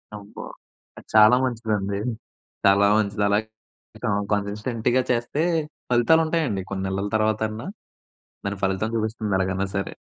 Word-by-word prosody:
అబ్బ! 105 Hz, 0 st, -12 dB, 0.6 s
అది -, -, -13 dB
చాలా 110 Hz, +3 st, +8 dB
మంచిదండి. 105 Hz, -5 st, -2 dB, 0.7 s
చాలా 100 Hz, +1 st, +5 dB
మంచిది 105 Hz, -1 st, 0 dB
అలా 100 Hz, +1 st, +3 dB, 0.6 s
క -, -, -1 dB, 0.3 s
కన్సిస్టెంట్‌గా 110 Hz, +4 st, 0 dB
చేస్తే 120 Hz, +5 st, -1 dB, 0.5 s
ఫలితాలు 125 Hz, +7 st, +4 dB
ఉంటాయండి. 155 Hz, -, 0 dB
కొన్ని 95 Hz, -1 st, -3 dB
నెలల 100 Hz, +1 st, -2 dB
తర్వాతన్నా 110 Hz, -, 0 dB, 0.8 s
దాని 100 Hz, 0 st, -2 dB
ఫలితం 95 Hz, +3 st, 0 dB
చూపిస్తుంది 110 Hz, -2 st, -1 dB
ఎలాగనా 95 Hz, +1 st, 0 dB
సరే! 100 Hz, -, -3 dB
105 Hz, 120 wpm, -24 LUFS, 100-115 Hz, 0.8 s, చాలా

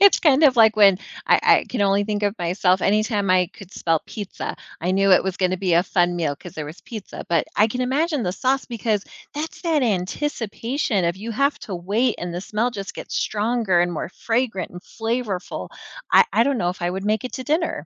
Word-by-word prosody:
It's 400 Hz, 0 st, +7 dB
kind 295 Hz, -1 st, +4 dB
of 265 Hz, -4 st, +5 dB
like 220 Hz, -2 st, +6 dB
when 200 Hz, -3 st, +6 dB, 0.3 s
I -, -, +5 dB
I -, -, +5 dB
can 235 Hz, -, -1 dB
only 200 Hz, +1 st, +2 dB
think 210 Hz, 0 st, -2 dB
of 205 Hz, 0 st, +1 dB
myself, 180 Hz, +1 st, +1 dB
anytime 210 Hz, 0 st, +1 dB
I 180 Hz, -1 st, +3 dB
could 195 Hz, -3 st, -13 dB
smell 165 Hz, -2 st, 0 dB
pizza, 205 Hz, -3 st, -6 dB, 0.2 s
I 175 Hz, -, -1 dB
knew 195 Hz, 0 st, +4 dB
it -, -, +6 dB
was 190 Hz, -1 st, -3 dB
gonna 185 Hz, -1 st, 0 dB
be 180 Hz, -3 st, +1 dB
a 170 Hz, -, +5 dB
fun 175 Hz, -1 st, +1 dB
meal 155 Hz, -4 st, -1 dB
'cause 175 Hz, -, -11 dB
there 155 Hz, -, -5 dB
was 150 Hz, +4 st, -10 dB
pizza 230 Hz, -8 st, -8 dB
but 170 Hz, -, +2 dB
I 215 Hz, -, +5 dB
can 250 Hz, +3 st, -3 dB
imagine 290 Hz, +3 st, 0 dB
the 180 Hz, -3 st, -1 dB
sauce 265 Hz, +6 st, 0 dB
because 220 Hz, -4 st, -2 dB, 0.3 s
that's 310 Hz, +2 st, -5 dB
that 320 Hz, -4 st, +1 dB
anticipation 225 Hz, +1 st, -1 dB
of 170 Hz, +1 st, 0 dB
you 220 Hz, +4 st, -6 dB
have 280 Hz, +5 st, +1 dB
to 200 Hz, -6 st, -6 dB
wait 210 Hz, +8 st, 0 dB
and 175 Hz, 0 st, -4 dB
the 175 Hz, -, -3 dB
smell 220 Hz, +5 st, -1 dB
just 200 Hz, -4 st, -7 dB
gets -, -, -7 dB
stronger, 215 Hz, -4 st, +1 dB
and 175 Hz, 0 st, +1 dB
more 160 Hz, -, -4 dB
fragrant, 225 Hz, -1 st, -2 dB
and 180 Hz, -, -9 dB
flavorful. 225 Hz, -3 st, -4 dB, 0.4 s
I -, -, +7 dB
I 230 Hz, -, +4 dB
don't 280 Hz, -1 st, 0 dB
know 175 Hz, -3 st, +1 dB
if 180 Hz, -, -9 dB
I 175 Hz, -, 0 dB
would 190 Hz, +2 st, -4 dB
make 215 Hz, +2 st, 0 dB
it 255 Hz, -, -5 dB
to 260 Hz, -, -5 dB
dinner. 310 Hz, -, -1 dB
205 Hz, 225 wpm, -22 LUFS, 180-245 Hz, 0.4 s, It's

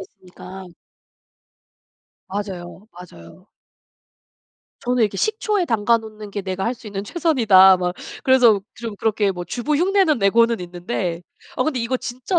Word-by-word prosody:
있으니까. 185 Hz, 0 st, -12 dB, 1.6 s
맞아요. 190 Hz, -1 st, -6 dB
맞아요. 175 Hz, -, -14 dB, 1.3 s
저는 250 Hz, -1 st, 0 dB
이렇게 205 Hz, -2 st, 0 dB
'식초에 425 Hz, -, 0 dB
담가 230 Hz, -3 st, +2 dB
놓는 215 Hz, -2 st, -10 dB
게 205 Hz, -, -4 dB
내가 190 Hz, 0 st, -3 dB
할 235 Hz, -, -1 dB
수 235 Hz, -, -15 dB
있는 200 Hz, -1 st, -5 dB
최선이다.' 210 Hz, -, +5 dB
막 180 Hz, 0 st, -2 dB, 0.3 s
그래서 245 Hz, -6 st, +5 dB
좀 230 Hz, -2 st, -6 dB
그렇게 210 Hz, -1 st, 0 dB
뭐 180 Hz, -1 st, -6 dB
주부 245 Hz, -, -2 dB
흉내는 365 Hz, -3 st, +2 dB
내고는 230 Hz, +2 st, +3 dB
있는데 175 Hz, 0 st, -4 dB, 0.3 s
어 255 Hz, -, +1 dB
근데 270 Hz, -4 st, -1 dB
이거 235 Hz, +3 st, -1 dB
진짜 255 Hz, +9 st, -2 dB
215 Hz, 290 characters per minute, -21 LUFS, 190-250 Hz, 1.6 s, 최선이다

